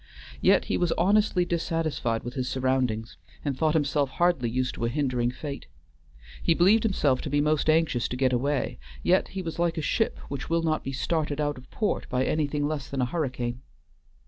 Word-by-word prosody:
Yet -, -, +4 dB
he -, -, 0 dB
was 175 Hz, -2 st, +1 dB
honestly 200 Hz, 0 st, +3 dB
dissatisfied 160 Hz, -9 st, -1 dB
with 120 Hz, -, -5 dB
his 130 Hz, -2 st, -2 dB
surroundings, 130 Hz, -4 st, -1 dB, 0.3 s
and 140 Hz, -2 st, 0 dB
thought 155 Hz, +3 st, +1 dB
himself 145 Hz, -2 st, +1 dB
hardly 170 Hz, -6 st, +1 dB
used 130 Hz, +2 st, -2 dB
by 115 Hz, -, 0 dB
a -, -, -1 dB
hindering 125 Hz, -3 st, 0 dB
fate. 140 Hz, +3 st, -6 dB, 0.7 s
He 165 Hz, -, +3 dB
believed 195 Hz, +7 st, +5 dB
himself 150 Hz, -, +1 dB
to -, -, -4 dB
be 145 Hz, +1 st, +2 dB
most 150 Hz, +1 st, +2 dB
anxious 155 Hz, -6 st, +2 dB
to 125 Hz, -, -4 dB
get 130 Hz, -1 st, +2 dB
away, 135 Hz, -, 0 dB, 0.2 s
yet 185 Hz, +2 st, +3 dB
he 190 Hz, -1 st, -5 dB
was 165 Hz, 0 st, -5 dB
like 170 Hz, -1 st, +1 dB
a -, -, 0 dB
ship 225 Hz, +9 st, 0 dB
which 135 Hz, -2 st, -5 dB
will 165 Hz, 0 st, +1 dB
not 155 Hz, -1 st, 0 dB
be 135 Hz, -, -4 dB
started 150 Hz, +1 st, -1 dB
out 145 Hz, -2 st, -1 dB
of 125 Hz, -, -17 dB
port 215 Hz, -, -2 dB
by 125 Hz, +1 st, +1 dB
anything 145 Hz, -1 st, 0 dB
less 150 Hz, -3 st, -4 dB
than 135 Hz, -1 st, -2 dB
a -, -, +3 dB
hurricane. 125 Hz, -4 st, -3 dB
145 Hz, 200 wpm, -27 LUFS, 130-165 Hz, 0.7 s, believed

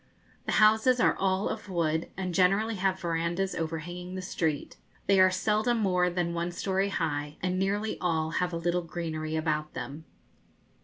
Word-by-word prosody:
The -, -, 0 dB
houses 220 Hz, +4 st, +5 dB
are -, -, +4 dB
all 190 Hz, +1 st, +1 dB
of -, -, -5 dB
wood, 165 Hz, -3 st, 0 dB
and 185 Hz, -2 st, -3 dB
generally 195 Hz, +5 st, +3 dB
have 190 Hz, 0 st, 0 dB
verandahs 170 Hz, +2 st, -1 dB
overhanging 175 Hz, +3 st, -4 dB
the 185 Hz, -, -4 dB
street. 160 Hz, -5 st, -2 dB, 0.3 s
They 195 Hz, 0 st, +4 dB
are 185 Hz, 0 st, +7 dB
seldom 215 Hz, +5 st, +1 dB
more 180 Hz, -4 st, +2 dB
than 175 Hz, -1 st, -1 dB
one 170 Hz, +1 st, -2 dB
story 195 Hz, +2 st, 0 dB
high, 150 Hz, -5 st, -2 dB
and 185 Hz, 0 st, -1 dB
nearly 205 Hz, +3 st, -1 dB
all 160 Hz, -3 st, 0 dB
have 180 Hz, +1 st, 0 dB
a 170 Hz, -, -2 dB
little 175 Hz, +1 st, 0 dB
greenery 160 Hz, -2 st, -4 dB
about 155 Hz, -1 st, -1 dB
them. 150 Hz, +3 st, -6 dB
180 Hz, 165 wpm, -29 LUFS, 165-195 Hz, 0.3 s, are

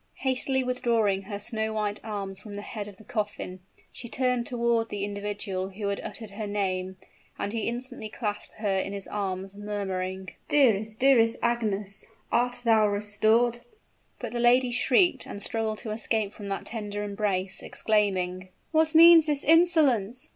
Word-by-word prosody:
Hastily 265 Hz, 0 st, +1 dB
withdrawing 230 Hz, -6 st, +1 dB
her 200 Hz, +1 st, -6 dB
snow 220 Hz, +1 st, -3 dB
white 210 Hz, -1 st, -1 dB
arms 200 Hz, -3 st, -5 dB
from 205 Hz, 0 st, -10 dB
the 205 Hz, -, -6 dB
head 210 Hz, -2 st, -6 dB
of 200 Hz, -2 st, -12 dB
the 220 Hz, -, -15 dB
coffin, 205 Hz, -4 st, -4 dB, 0.3 s
she 250 Hz, -, -7 dB
turned 250 Hz, -1 st, 0 dB
toward 235 Hz, -2 st, 0 dB
the 205 Hz, -1 st, -4 dB
individual 200 Hz, -2 st, -3 dB
who 200 Hz, +1 st, -4 dB
had 200 Hz, -, -2 dB
uttered 220 Hz, -3 st, -7 dB
her 210 Hz, +1 st, -5 dB
name, 190 Hz, -2 st, -2 dB, 0.4 s
and 205 Hz, -, -3 dB
he 225 Hz, -2 st, -2 dB
instantly 245 Hz, -1 st, -4 dB
clasped 210 Hz, -1 st, -5 dB
her 205 Hz, -3 st, -1 dB
in 195 Hz, +1 st, -3 dB
his 200 Hz, -1 st, -3 dB
arms, 195 Hz, -1 st, -4 dB
murmuring, 190 Hz, -3 st, -4 dB, 0.2 s
"Dearest 220 Hz, -6 st, +3 dB
dearest 240 Hz, -4 st, +4 dB
Agnes, 210 Hz, -4 st, -1 dB, 0.2 s
art 245 Hz, +1 st, +1 dB
thou 220 Hz, -2 st, +4 dB
restored 215 Hz, +4 st, +2 dB, 0.3 s
" -, -, -41 dB
But 240 Hz, -3 st, -5 dB
the 240 Hz, -, -3 dB
lady 245 Hz, +1 st, +4 dB
shrieked, 265 Hz, +5 st, +3 dB
and 200 Hz, -, -6 dB
struggled 220 Hz, -1 st, -1 dB
to 220 Hz, -, -4 dB
escape 215 Hz, -1 st, -1 dB
from 205 Hz, -, -9 dB
that 195 Hz, 0 st, -4 dB
tender 205 Hz, -2 st, -4 dB
embrace, 200 Hz, -2 st, -1 dB
exclaiming, 185 Hz, -4 st, 0 dB, 0.2 s
"What 315 Hz, 0 st, +2 dB
means 330 Hz, -1 st, +9 dB
this 290 Hz, -2 st, 0 dB
insolence? 295 Hz, -, +3 dB
215 Hz, 160 wpm, -27 LUFS, 200-240 Hz, 0.4 s, means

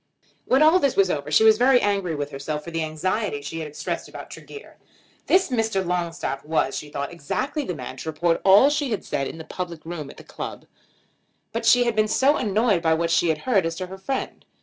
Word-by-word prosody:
When 265 Hz, +4 st, +4 dB
all 320 Hz, +4 st, +6 dB
this 280 Hz, -5 st, +1 dB
was 190 Hz, -2 st, +3 dB
over 145 Hz, 0 st, -3 dB
she 150 Hz, +8 st, +4 dB
was 220 Hz, 0 st, +6 dB
very 255 Hz, 0 st, +5 dB
angry 195 Hz, -6 st, 0 dB
with 145 Hz, 0 st, -4 dB
herself 150 Hz, +2 st, -4 dB
for 170 Hz, -, -8 dB
the 165 Hz, -1 st, -1 dB
anxiety 155 Hz, +1 st, -2 dB
she 165 Hz, +3 st, -5 dB
had 160 Hz, -, -4 dB
expressed 150 Hz, -, -5 dB
about -, -, -10 dB
Tregear. 430 Hz, -, -11 dB, 0.5 s
This 375 Hz, +1 st, +3 dB
Mr. 225 Hz, -6 st, 0 dB
Longstaff 170 Hz, -6 st, -2 dB
was, 150 Hz, -3 st, 0 dB
she 150 Hz, -, -6 dB
thought, 140 Hz, +2 st, -4 dB
exactly 260 Hz, -, -3 dB
the 180 Hz, -, -3 dB
man 130 Hz, -1 st, -7 dB
to 160 Hz, -, -5 dB
report 165 Hz, +2 st, 0 dB
all 200 Hz, +9 st, +7 dB
she 290 Hz, -2 st, -1 dB
had 215 Hz, -, -3 dB
said 135 Hz, -, -2 dB
in -, -, -8 dB
the 160 Hz, -, -8 dB
public 170 Hz, -2 st, -6 dB
room 160 Hz, -4 st, -6 dB
at -, -, -13 dB
the -, -, -12 dB
club. -, -, -7 dB, 0.9 s
But 230 Hz, 0 st, -2 dB
she 245 Hz, +2 st, +6 dB
had 235 Hz, -2 st, 0 dB
been 215 Hz, 0 st, +2 dB
annoyed 225 Hz, -, +2 dB
by 160 Hz, -1 st, +3 dB
what 165 Hz, +1 st, -1 dB
she 170 Hz, 0 st, +3 dB
had 160 Hz, -, +1 dB
heard 220 Hz, -8 st, +3 dB
as 165 Hz, 0 st, -2 dB
to 185 Hz, +2 st, -4 dB
her 190 Hz, +1 st, -9 dB
friend. 265 Hz, +7 st, -4 dB
180 Hz, 225 wpm, -24 LUFS, 155-225 Hz, 0.9 s, all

